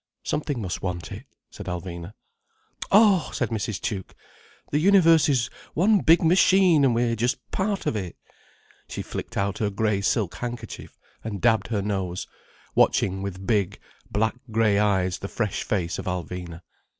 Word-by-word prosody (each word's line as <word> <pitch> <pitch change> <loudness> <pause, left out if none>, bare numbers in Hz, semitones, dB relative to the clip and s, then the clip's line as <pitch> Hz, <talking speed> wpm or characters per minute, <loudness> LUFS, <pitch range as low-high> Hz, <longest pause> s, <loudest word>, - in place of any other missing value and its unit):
"Something 145 -6 -2
must 90 - -4
want 85 -5 -4
it," - - -8 0.3
said - - -9
Alvina. 90 +1 -5 0.8
"Oh!" 200 -4 +5
said 120 - -1
Mrs. 110 -4 -3
Tuke. 95 -4 -4 0.6
"The 145 - +2
universe 165 -4 +5
is 125 -4 +1 0.2
one 205 +5 +4
big 165 0 +5
machine, 180 -2 +5
and 125 -4 +3
we're 115 0 +1
just 120 +3 0
part 200 0 -1
of - - 0
it." 95 -5 -4 0.7
She - - -5
flicked - - -6
out 100 0 -1
her 105 - +1
grey 105 0 0
silk 100 -2 0
handkerchief, 120 -2 -7 0.3
and 105 -3 -4
dabbed 115 0 +2
her 105 -4 -1
nose, 95 -3 -2 0.5
watching 95 0 +2
with 95 -1 -6
big, 100 -3 0 0.3
black 110 +2 +1 0.2
grey 110 -2 +2
eyes 95 -3 +1
the 100 - -5
fresh 105 0 -2
face 90 -4 -2
of 95 - -6
Alvina. 90 -2 -5
105 Hz, 155 wpm, -25 LUFS, 95-135 Hz, 0.8 s, Oh